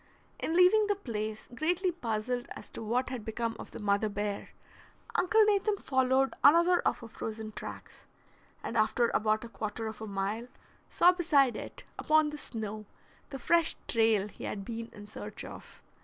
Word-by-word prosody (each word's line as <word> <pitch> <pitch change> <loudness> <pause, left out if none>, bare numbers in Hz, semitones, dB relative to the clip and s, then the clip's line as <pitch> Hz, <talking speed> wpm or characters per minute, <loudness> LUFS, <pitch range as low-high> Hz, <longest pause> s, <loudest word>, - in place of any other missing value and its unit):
In 325 - -1
leaving 370 +4 +6
the 410 - +2
place, 220 - -5
greatly 355 +7 +1
puzzled 245 -4 -2
as - - -10
to - - -7
what 240 +4 0
had 255 -4 -5
become 225 +1 -2
of - - -8
the - - -9
mother 205 0 +1
bear, 205 0 -3 0.6
Uncle 430 +5 +4
Nathan 415 0 +2
followed 260 -3 +2
another 340 +4 +6
of - - 0
her 230 - -8
frozen 220 -1 -6
tracks, - - -9 0.6
and - - -4
after 230 +2 +3
about 215 +1 +2
a - - -6
quarter 225 -1 -4
of 220 0 -6
a 220 - -5
mile 200 +4 -2 0.4
saw 355 - +6
beside 295 -8 +3
it, - - -8 0.2
upon 310 -1 +3
the 300 - -7
snow, 215 -4 -6 0.4
the 275 - -5
fresh 335 +5 +2
trail 220 -3 +3
he - - -9
had 200 -1 -4
been 230 +1 -5
in 205 - -11
search 210 - -7
of. - - -11
235 Hz, 170 wpm, -30 LUFS, 215-310 Hz, 0.6 s, leaving